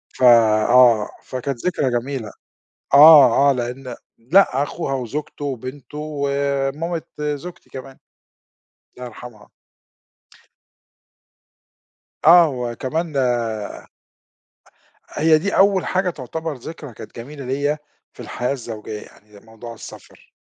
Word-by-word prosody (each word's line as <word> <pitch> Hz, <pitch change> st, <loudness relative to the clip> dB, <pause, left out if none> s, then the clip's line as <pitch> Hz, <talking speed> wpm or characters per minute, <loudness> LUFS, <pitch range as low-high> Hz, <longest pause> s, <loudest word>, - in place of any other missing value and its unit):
ف -, -, -4 dB
آه. 115 Hz, -1 st, +5 dB, 0.2 s
فكانت 130 Hz, -1 st, -5 dB
ذكرى 155 Hz, -7 st, 0 dB
جميلة. 125 Hz, -4 st, -6 dB, 0.6 s
آه، 140 Hz, -2 st, +8 dB
آه. -, -, +5 dB
لإن 125 Hz, +1 st, -5 dB, 0.4 s
لأ 160 Hz, -8 st, +4 dB
أخوها 145 Hz, -1 st, -4 dB
وزوجته 140 Hz, +3 st, -5 dB
وبنته 135 Hz, +2 st, -7 dB
ومامت 140 Hz, +2 st, -2 dB
زوجتي 150 Hz, +4 st, -6 dB
كمان. 130 Hz, 0 st, -10 dB, 1.0 s
الله 125 Hz, -, -8 dB
يرحمها. 115 Hz, -2 st, -13 dB, 2.8 s
آه، 170 Hz, +1 st, +7 dB
وكمان 130 Hz, +7 st, -4 dB, 2.0 s
هي 155 Hz, +1 st, +3 dB
دي 200 Hz, +5 st, -2 dB
أول 195 Hz, -2 st, +3 dB
حاجة 185 Hz, 0 st, 0 dB
تعتبر 160 Hz, +2 st, -6 dB
ذكرى 145 Hz, +1 st, -10 dB
كانت 110 Hz, -, -12 dB
جميلة 140 Hz, +4 st, -9 dB
ليّا 145 Hz, +4 st, -1 dB, 0.3 s
في -, -, -15 dB
الحياة 125 Hz, +2 st, -3 dB
الزوجيّة 110 Hz, -4 st, -7 dB
يعني 105 Hz, -1 st, -18 dB
موضوع 115 Hz, +2 st, -11 dB
السفر. 110 Hz, -, -14 dB
135 Hz, 100 wpm, -20 LUFS, 120-150 Hz, 2.8 s, آه